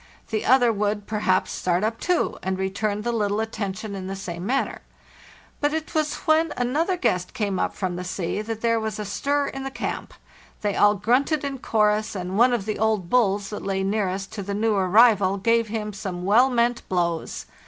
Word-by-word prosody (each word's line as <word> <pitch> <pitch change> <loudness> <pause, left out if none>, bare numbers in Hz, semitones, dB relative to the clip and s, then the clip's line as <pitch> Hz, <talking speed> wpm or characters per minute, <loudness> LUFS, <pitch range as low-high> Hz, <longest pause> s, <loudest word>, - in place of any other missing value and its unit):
The 215 - -1
other 245 -2 +5
would, 205 0 -1
perhaps, 205 -3 +1
start 180 +1 0
up 225 +1 -1
too, 360 -1 0
and 190 0 -2
return 205 +2 -2
the 240 - 0
little 210 -2 0
at 220 0 -2
tention 205 0 -4
in 190 -1 -5
the 195 - -4
same 175 -3 -6
manner. 270 +3 -1 0.8
But 295 +1 +1
it 320 -1 -4
was 310 -1 0
when 315 0 +3
an 245 +2 -2
other 350 +4 +1
guest 180 - -1
came 200 -3 -1
up - - -1
from 185 -3 -3
the 180 - -4
sea 185 +2 -3
that 225 0 -5
there 230 -1 +2
was 220 -1 -3
a 210 - -4
stir 285 +7 0
in 270 0 -6
the 270 - -3
camp; - - -5 0.5
they 205 -2 -1
all 205 0 +5
grunted 255 - +1
in 275 -2 -3
chorus, 215 -1 +1
and 185 0 -4
one 240 +4 +5
of 235 -5 -1
the 215 - -3
old 215 -5 0
bulis 205 -5 +2
that 210 - -5
lay 195 -1 -1
nearest 195 -1 -1
to 215 - -4
the 200 +1 -4
new 220 +1 +1
arrival 200 0 +4
gave 230 +3 +2
him 210 -1 -4
some 190 -3 -5
well 235 +7 +5
meant 240 -1 +1
blows. 170 -3 -1
210 Hz, 205 wpm, -24 LUFS, 195-235 Hz, 0.8 s, other